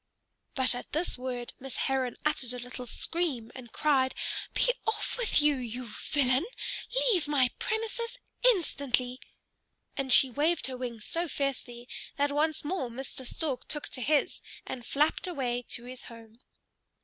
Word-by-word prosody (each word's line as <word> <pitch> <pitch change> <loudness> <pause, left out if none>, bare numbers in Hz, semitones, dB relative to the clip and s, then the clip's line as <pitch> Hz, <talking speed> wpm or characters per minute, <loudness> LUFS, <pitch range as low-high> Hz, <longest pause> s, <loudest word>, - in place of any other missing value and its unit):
But 260 -2 +6
at 245 - -7
this 320 +4 0
word 250 -1 -4
Miss 265 0 -5
Heron 265 -2 +1
uttered 260 -5 0
a - - -4
little 250 0 -6
scream 280 -7 -2
and 240 -3 -10
cried, 270 -4 +3 0.4
"Be - - +5
off 440 - 0
with 450 -11 +3
you, 295 -2 +5
you 245 0 -4
villain! 260 - +1 0.6
Leave 350 -8 +3
my 275 -4 +4
premises 460 +2 -2 0.3
instantly!" 275 - +3 0.8
and 270 -2 -1
she 260 +1 +8
waved 310 +7 +2
her 260 - -3
wings 240 -4 -5
so 340 +1 -1
fiercely 250 -4 -3 0.3
that 285 0 +2
once 305 +2 +1
more 300 -6 -1
Mr. 260 +1 -6
Stork 275 -5 -2
took 300 -1 -1
to 255 - -5
his 295 +3 +2 0.2
and 245 - -5
flapped 300 +5 +2
away 255 -8 -1
to 240 - -4
his 250 0 -9
home. 230 -1 -12
265 Hz, 150 wpm, -30 LUFS, 245-305 Hz, 0.8 s, she